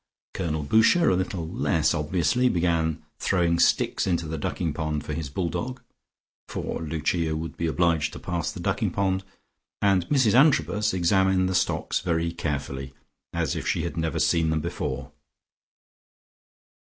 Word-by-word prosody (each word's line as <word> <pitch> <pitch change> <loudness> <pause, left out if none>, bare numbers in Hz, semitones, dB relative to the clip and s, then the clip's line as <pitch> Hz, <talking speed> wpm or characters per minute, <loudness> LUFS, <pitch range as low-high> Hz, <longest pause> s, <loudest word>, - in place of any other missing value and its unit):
Colonel 80 -4 -2
Boucher, 110 - +4
a - - +3
little 90 -2 -2
less - - +1
obviously, 85 +10 +1
began 85 -4 0 0.2
throwing 85 -2 +1
sticks - - +2
into 85 -3 0
the 80 0 -4
ducking 80 +1 -2
pond 75 -2 -3
for - - -4
his 80 -4 -4
bull 85 +5 -2
dog 125 +8 -4 0.7
(for - - -4
Lucia 80 +1 -1
would 80 +1 -5
be 85 - -2
obliged 80 -2 +1
to - - -7
pass 85 -3 -2
the - - -9
ducking - - 0
pond) 95 -1 0 0.6
and 95 -3 +2
Mrs 130 -7 +3
Antrobus 105 - +4
examined 95 +1 +2
the 95 - -1
stocks 90 - 0
very 85 -2 0
carefully, 70 -4 -4 0.4
as - - -1
if - - -4
she 80 - 0
had 85 - -4
never 80 -1 -1
seen 80 -2 +2
them 80 0 +1
before. 85 -4 -4
85 Hz, 155 wpm, -25 LUFS, 80-95 Hz, 0.7 s, Boucher